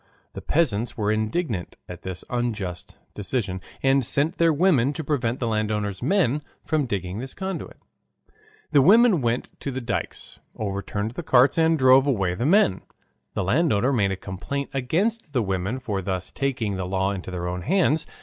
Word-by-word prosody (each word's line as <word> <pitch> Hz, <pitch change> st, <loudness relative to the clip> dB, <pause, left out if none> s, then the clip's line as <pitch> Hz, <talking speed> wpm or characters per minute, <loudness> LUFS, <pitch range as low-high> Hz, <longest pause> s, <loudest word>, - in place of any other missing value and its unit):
The -, -, -7 dB
peasants 125 Hz, -7 st, 0 dB
were 105 Hz, -1 st, +1 dB
indignant 110 Hz, -, -2 dB
at 90 Hz, 0 st, -9 dB
this 95 Hz, -1 st, -6 dB
unjust 110 Hz, -8 st, -3 dB, 0.2 s
decision, 100 Hz, -3 st, -3 dB, 0.2 s
and 135 Hz, 0 st, +4 dB
sent 145 Hz, +8 st, 0 dB
their 165 Hz, -1 st, +5 dB
women 150 Hz, -5 st, +3 dB
to 160 Hz, -, -5 dB
prevent 130 Hz, -5 st, -1 dB
the 120 Hz, -, -1 dB
landowner's 105 Hz, -3 st, -1 dB
men 150 Hz, -, +2 dB, 0.2 s
from 155 Hz, -4 st, 0 dB
digging 95 Hz, -2 st, -3 dB
this 130 Hz, +2 st, -6 dB
conduit. 190 Hz, -2 st, -5 dB, 0.9 s
The 145 Hz, -, +6 dB
women 210 Hz, -, +6 dB
went 120 Hz, 0 st, -1 dB
to -, -, -4 dB
the 130 Hz, -1 st, -3 dB
dykes, 120 Hz, -, -5 dB, 0.2 s
overturned 100 Hz, +1 st, -3 dB
the 125 Hz, -, -5 dB
carts, 130 Hz, 0 st, +4 dB
and 160 Hz, 0 st, +4 dB
drove 130 Hz, 0 st, +6 dB
away 100 Hz, -10 st, +1 dB
the 120 Hz, +9 st, -1 dB
men. 160 Hz, -, +4 dB, 0.5 s
The -, -, 0 dB
landowner 130 Hz, -, +2 dB
made 100 Hz, -6 st, +2 dB
a -, -, -1 dB
complaint 95 Hz, +10 st, -5 dB
against 165 Hz, -, -1 dB
the 125 Hz, -4 st, +2 dB
women 95 Hz, +5 st, -2 dB
for 105 Hz, -6 st, -3 dB
thus 95 Hz, -1 st, -4 dB
taking 120 Hz, -8 st, -2 dB
the 95 Hz, -, -3 dB
law 95 Hz, +1 st, 0 dB
into 95 Hz, -2 st, -5 dB
their 90 Hz, -1 st, -4 dB
own 90 Hz, 0 st, -3 dB
hands. 160 Hz, -, +2 dB
120 Hz, 170 wpm, -24 LUFS, 100-145 Hz, 0.9 s, The